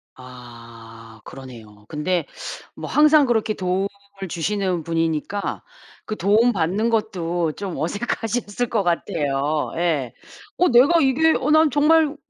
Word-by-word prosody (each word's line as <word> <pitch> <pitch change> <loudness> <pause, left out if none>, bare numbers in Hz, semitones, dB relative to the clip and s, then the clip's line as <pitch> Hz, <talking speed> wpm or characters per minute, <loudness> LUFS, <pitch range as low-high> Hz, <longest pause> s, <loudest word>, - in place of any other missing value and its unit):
아 115 -3 -13
그러네요. 110 -6 -12
근데 160 +2 -1 0.5
뭐 - - -7
항상 300 -1 +5
그렇게 225 -3 0
도움을 190 0 -1 0.4
주시는 180 0 -2
분이니까 165 +4 -2 0.4
그 215 - -4
도움 215 +6 +3
받는 195 +5 0
것도 175 -7 -1
좀 195 -1 -6
어색하셨을 225 - -2
것 215 -4 0
같아요. 150 -3 -1
예. 155 -8 -1 0.4
'어 360 - +3
내가 270 +8 +5
이게 305 +4 +3
어 275 +3 0
난 310 0 +5
정말 300 +2 +3
185 Hz, 245 characters per minute, -22 LUFS, 150-235 Hz, 0.5 s, 항상